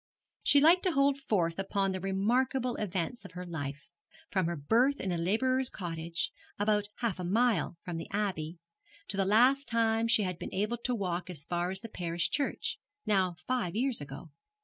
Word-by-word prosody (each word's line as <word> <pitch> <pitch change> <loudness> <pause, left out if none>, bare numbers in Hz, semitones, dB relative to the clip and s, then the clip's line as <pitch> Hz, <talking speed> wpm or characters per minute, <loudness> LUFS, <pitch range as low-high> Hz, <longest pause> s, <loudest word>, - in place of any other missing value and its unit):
She 285 - +6
liked 330 +5 +6
to 365 - +2
hold 275 0 +3
forth 185 -10 0
upon 195 0 0
the 185 - -3
remarkable 240 +7 +1
events 205 +4 -2
of 195 -3 -11
her 180 +1 -6
life 145 -4 -5 0.4
from 190 -4 +1
her 170 - -1
birth 235 - +2
in 190 - -2
a - - 0
labourer's 255 +9 +1
cottage, 165 -2 -3 0.3
about 210 0 +2
half 235 -5 -1
a - - -3
mile 210 -2 +2
from 175 -2 -4
the 165 - -6
Abbey, 180 -5 -2 0.5
to - - -2
the 195 -1 +2
last 250 +7 +4
time 225 -1 +2
she 225 -2 +4
had 180 -3 -3
been - - -6
able 210 +5 0
to 250 - +1
walk 185 -3 -2
as 155 -5 -5
far 175 +1 -1
as 190 +1 -5
the 230 - -6
parish 175 -5 -2
church, 285 -1 -1 0.3
now 190 -4 +2
five 245 -9 -1
years 250 - 0
ago. 145 +3 -8
195 Hz, 190 wpm, -31 LUFS, 175-240 Hz, 0.5 s, She